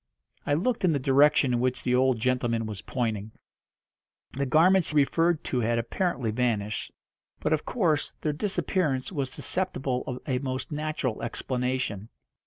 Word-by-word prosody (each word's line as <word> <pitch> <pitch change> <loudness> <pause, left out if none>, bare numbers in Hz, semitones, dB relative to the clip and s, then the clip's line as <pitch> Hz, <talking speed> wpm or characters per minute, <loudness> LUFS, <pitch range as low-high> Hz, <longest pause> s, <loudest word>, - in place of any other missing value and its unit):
I 145 - +3
looked 215 +9 0
in 175 -3 +4
the - - +2
direction 140 0 +4
in 120 - +1
which 125 +1 0
the 125 - +1
old 130 -1 +3
gentleman 120 -2 0
was 105 -3 -6
pointing. 110 -4 -3 1.0
The 140 +1 -2
garments 175 +6 +4
he 155 - -4
referred 165 +3 +3
to 125 - -1
had 115 0 +1
apparently 125 - -1
vanished, 110 -3 -1 0.5
but, 150 - +1
of 155 - -1
course, 165 -11 0
their 150 - 0
disappearance 155 -5 -1
was 140 -6 -2
susceptible 135 -8 -2
of 125 - -3
a 130 -4 0
most 130 0 -4
natural 150 -6 -2
explanation. 125 -3 -2
130 Hz, 155 wpm, -27 LUFS, 120-155 Hz, 1.0 s, in